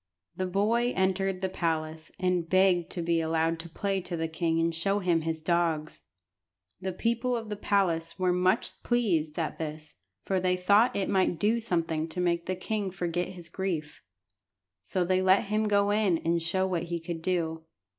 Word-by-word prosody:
The 185 Hz, -, -2 dB
boy 225 Hz, +6 st, +1 dB
entered 190 Hz, 0 st, 0 dB
the 190 Hz, -, +1 dB
palace, 160 Hz, -3 st, -2 dB
and 180 Hz, -2 st, 0 dB
begged 185 Hz, -2 st, +3 dB
to 175 Hz, -, -3 dB
be 165 Hz, 0 st, +1 dB
allowed 160 Hz, 0 st, 0 dB
to 170 Hz, +1 st, -7 dB
play 195 Hz, +3 st, -1 dB
to 175 Hz, -1 st, -5 dB
the 165 Hz, 0 st, -1 dB
king 165 Hz, 0 st, 0 dB
and 165 Hz, 0 st, +1 dB
show 195 Hz, +5 st, 0 dB
him 175 Hz, -4 st, +1 dB
his 160 Hz, 0 st, -3 dB
dogs. 165 Hz, -2 st, 0 dB, 0.8 s
The 190 Hz, 0 st, -2 dB
people 235 Hz, +5 st, 0 dB
of 225 Hz, -2 st, -6 dB
the 210 Hz, -, -2 dB
palace 180 Hz, -5 st, 0 dB
were 185 Hz, -1 st, +2 dB
much 185 Hz, +6 st, +1 dB
pleased 175 Hz, -11 st, +1 dB
at 165 Hz, -3 st, -2 dB
this, 155 Hz, -3 st, -6 dB, 0.3 s
for 190 Hz, -1 st, +1 dB
they 180 Hz, 0 st, +1 dB
thought 205 Hz, +6 st, +4 dB
it 195 Hz, -, 0 dB
might 185 Hz, -3 st, +2 dB
do 220 Hz, +5 st, +2 dB
something 165 Hz, -7 st, -1 dB
to 165 Hz, +2 st, -6 dB
make 170 Hz, -1 st, 0 dB
the 185 Hz, -, -1 dB
king 205 Hz, +2 st, -2 dB
forget 175 Hz, -1 st, -2 dB
his 175 Hz, -3 st, -8 dB
grief. 170 Hz, -4 st, -4 dB, 0.8 s
So 180 Hz, -, -1 dB
they 185 Hz, +1 st, +2 dB
let 190 Hz, +1 st, +4 dB
him 215 Hz, +1 st, 0 dB
go 200 Hz, 0 st, +3 dB
in 205 Hz, -5 st, +3 dB
and 170 Hz, +1 st, 0 dB
show 185 Hz, +3 st, +1 dB
what 175 Hz, -2 st, -1 dB
he 170 Hz, -1 st, -2 dB
could 165 Hz, 0 st, -5 dB
do. 160 Hz, -2 st, -1 dB
180 Hz, 185 wpm, -28 LUFS, 165-195 Hz, 0.8 s, thought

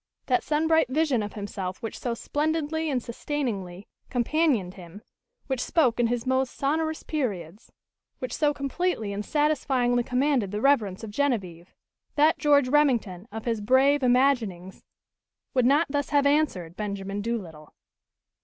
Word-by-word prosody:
That 250 Hz, -2 st, +2 dB
sun 310 Hz, +1 st, 0 dB
bright 320 Hz, -4 st, +4 dB
vision 285 Hz, -4 st, +1 dB
of 205 Hz, 0 st, -5 dB
himself 200 Hz, -2 st, -5 dB
which 225 Hz, -, -5 dB
so 240 Hz, -2 st, -2 dB
splendidly 315 Hz, +4 st, -1 dB
and 255 Hz, -4 st, -1 dB
sustainingly 215 Hz, -8 st, -4 dB, 0.2 s
companioned 245 Hz, -, +1 dB
him, 185 Hz, +3 st, -12 dB, 0.4 s
which 265 Hz, -3 st, -2 dB
spoke 255 Hz, -9 st, +2 dB
in 240 Hz, -, +3 dB
his 235 Hz, 0 st, -2 dB
most 260 Hz, 0 st, 0 dB
sonorous 315 Hz, +3 st, -1 dB
periods, 205 Hz, -, -4 dB, 0.5 s
which 255 Hz, -2 st, -5 dB
so 295 Hz, -1 st, +2 dB
completely 280 Hz, -, -2 dB
and 205 Hz, +1 st, -3 dB
satisfyingly 260 Hz, -4 st, +1 dB
commanded 250 Hz, -3 st, +1 dB
the 205 Hz, +2 st, -3 dB
reverence 225 Hz, -7 st, +2 dB
of 220 Hz, -, -6 dB
Genevieve 200 Hz, -10 st, -2 dB, 0.4 s
that 305 Hz, +2 st, +4 dB
George 285 Hz, -3 st, +4 dB
Remington 240 Hz, -9 st, +1 dB
of 220 Hz, +1 st, -7 dB
his 230 Hz, -3 st, -1 dB
brave 270 Hz, +6 st, +4 dB
imaginings 245 Hz, -8 st, +1 dB, 0.7 s
would 255 Hz, -2 st, +3 dB
not 290 Hz, +5 st, +4 dB
thus 285 Hz, 0 st, -2 dB
have 285 Hz, -2 st, +3 dB
answered 280 Hz, -, +1 dB
Benjamin 200 Hz, -1 st, -4 dB
Doolittle. 185 Hz, -10 st, -5 dB
250 Hz, 145 wpm, -26 LUFS, 205-290 Hz, 0.7 s, bright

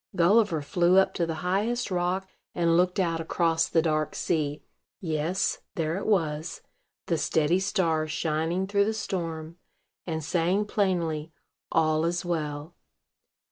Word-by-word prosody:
Gulliver 180 Hz, -2 st, +3 dB
flew 175 Hz, +4 st, +3 dB
up 190 Hz, -, +4 dB
to 170 Hz, -, -1 dB
the 165 Hz, -, -2 dB
highest 215 Hz, +6 st, 0 dB
rock, 180 Hz, +2 st, 0 dB, 0.3 s
and 170 Hz, -1 st, +2 dB
looked 180 Hz, +3 st, +2 dB
out 165 Hz, -3 st, 0 dB
across 165 Hz, 0 st, +1 dB
the 165 Hz, -, +2 dB
dark 155 Hz, -2 st, 0 dB
sea. 150 Hz, -3 st, -1 dB, 0.4 s
Yes, 165 Hz, +2 st, -1 dB, 0.2 s
there 160 Hz, 0 st, -1 dB
it 195 Hz, -, -4 dB
was, 160 Hz, -6 st, 0 dB, 0.4 s
the 165 Hz, -2 st, 0 dB
steady 160 Hz, +3 st, +2 dB
star 165 Hz, -5 st, 0 dB
shining 160 Hz, +4 st, -1 dB
through 200 Hz, +1 st, +2 dB
the 220 Hz, +1 st, -1 dB
storm, 170 Hz, -5 st, -4 dB, 0.5 s
and 160 Hz, -2 st, -3 dB
saying 175 Hz, +6 st, +1 dB
plainly, 170 Hz, -7 st, -1 dB, 0.4 s
"All 155 Hz, 0 st, +2 dB
is 175 Hz, +2 st, -1 dB
well." 155 Hz, -2 st, -3 dB
170 Hz, 140 wpm, -27 LUFS, 160-185 Hz, 0.5 s, up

